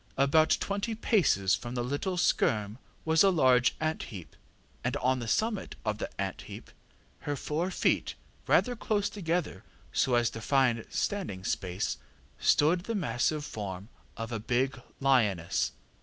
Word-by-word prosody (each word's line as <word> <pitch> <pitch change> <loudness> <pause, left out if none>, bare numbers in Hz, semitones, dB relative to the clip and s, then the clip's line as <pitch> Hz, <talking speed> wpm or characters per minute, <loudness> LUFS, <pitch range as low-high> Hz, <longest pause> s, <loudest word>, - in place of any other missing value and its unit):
About 140 +4 +4
twenty 205 +3 -2
paces 165 - +2
from 120 +1 -2
the 120 - -1
little 145 +9 -2
skerm 110 -9 +1 0.3
was 160 0 +4
a 195 - +6
large 130 -8 +4
ant 155 0 -1
heap, 90 - -10 0.5
and 125 +3 -1
on 130 -1 +1
the 120 - -5
summit 215 - -1
of 105 0 -1
the - - -3
ant 95 -2 -3
heap, - - -10 0.5
her 145 - -3
four 155 +6 -2
feet 185 - 0 0.3
rather 250 -1 +3
close 210 -3 -1
together, 175 -4 -2 0.3
so 125 - +2
as 120 -1 +2
to 115 - -7
find 125 -3 +2
standing 180 - -2
space, 90 0 -2 0.4
stood 175 +5 +3
the 230 - -2
massive 150 - 0
form 100 -3 -6 0.3
of 115 +1 -5
a 115 - -2
big 125 +5 0 0.2
lioness. 110 -11 +2
130 Hz, 150 wpm, -29 LUFS, 110-170 Hz, 0.5 s, a